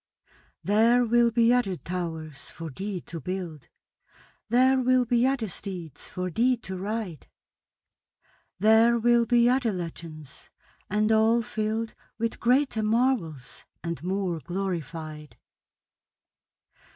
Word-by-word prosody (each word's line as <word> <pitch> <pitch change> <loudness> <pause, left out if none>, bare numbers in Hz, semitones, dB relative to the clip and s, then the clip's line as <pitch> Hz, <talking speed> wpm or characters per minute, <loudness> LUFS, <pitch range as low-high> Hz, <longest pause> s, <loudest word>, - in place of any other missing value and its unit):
There 230 +4 +4
will 235 +1 +4
be 235 +1 +4
other 240 -7 +1
towers 160 -5 -5
for 165 -2 -8
thee 190 +4 -5
to 165 -2 -8
build; 175 -4 -5 0.8
There 260 +3 +4
will 255 0 +3
be 240 +1 +3
other 265 -5 0
steeds 175 -6 -7
for 180 0 -4
thee 245 +7 +2
to 190 -4 -7
ride; 195 - -4 1.3
There 220 +4 +5
will 235 0 +3
be 240 -1 +4
other 250 -2 +2
legends, 165 -5 -8 0.4
and 215 +2 +1
all 220 +2 +4
filled 220 -1 -2 0.2
With 230 +1 -2
greater 250 -1 +2
marvels 215 - 0 0.2
and 170 -1 -4
more 185 -2 -1
glorified. 160 -4 -5
215 Hz, 115 wpm, -26 LUFS, 170-235 Hz, 1.3 s, There